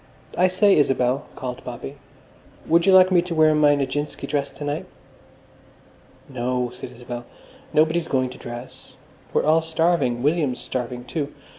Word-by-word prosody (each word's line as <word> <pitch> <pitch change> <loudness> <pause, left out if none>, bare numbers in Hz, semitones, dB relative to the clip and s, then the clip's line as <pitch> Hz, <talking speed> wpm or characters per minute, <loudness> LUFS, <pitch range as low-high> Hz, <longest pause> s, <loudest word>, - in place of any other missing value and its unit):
"I 180 - +4
say, 195 +2 +4
Isabel," 135 -2 +1
called 125 -2 -6
Bobby, 125 +3 -7 0.7
"would 170 +3 +3
you - - +7
like 185 0 +7
me 180 -2 +5
to 175 -1 -5
wear 155 -1 +5
my 150 -1 +4
Nijinsky 145 +1 -3
dress 140 -1 -1
to - - -10
night?" 145 +1 -3 1.4
"No," 125 -1 -2
said 125 - -8
Isabel, 120 0 -8 0.5
"nobody's 160 +2 +2
going 130 -1 0
to - - -12
dress. 120 +1 -9 0.3
We're - - +1
all 160 +2 +4
starving. 160 -7 +1
William's 145 -4 +1
starving, 125 -1 -4
too. 145 +2 -4
145 Hz, 150 wpm, -23 LUFS, 125-165 Hz, 1.4 s, you